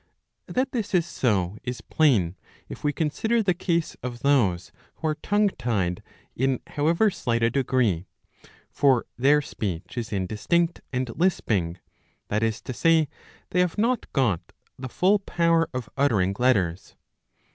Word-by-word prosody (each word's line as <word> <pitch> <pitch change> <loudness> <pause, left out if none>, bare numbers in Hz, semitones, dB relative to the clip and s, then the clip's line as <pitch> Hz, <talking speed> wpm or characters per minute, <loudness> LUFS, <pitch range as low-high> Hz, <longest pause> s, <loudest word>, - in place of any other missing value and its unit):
That 260 +1 -1
this 220 -6 -2
is 170 -2 +3
so 105 - 0
is 125 -2 -4
plain, 110 - +2 0.3
if - - -9
we 145 - +2
consider 220 +10 0
the 190 -3 +2
case 170 -2 -1
of 120 -1 -6
those 105 -12 +2 0.2
who 160 - -2
are - - +1
tongue 205 0 +2
tied 95 - -2 0.3
in 130 0 +1
however 165 +8 +2
slight 115 -8 -1
a 115 - +3
degree. 120 -9 +1 0.6
For 135 -4 +3
their 145 +4 +4
speech 95 -2 -4
is 115 -1 -5
indistinct 110 - 0
and 125 -2 -2
lisping; 105 - +1 0.5
that 105 +1 0
is 115 -2 0
to 130 - -5
say 160 +2 +3 0.4
they 180 - +1
have 180 0 +1
not 235 +3 0
got 120 - +1 0.3
the 130 0 -7
full 195 +9 +3
power 170 -4 +1
of 125 -4 -4
uttering 105 -9 +2
letters. 100 -8 +1
130 Hz, 145 wpm, -25 LUFS, 105-170 Hz, 0.6 s, their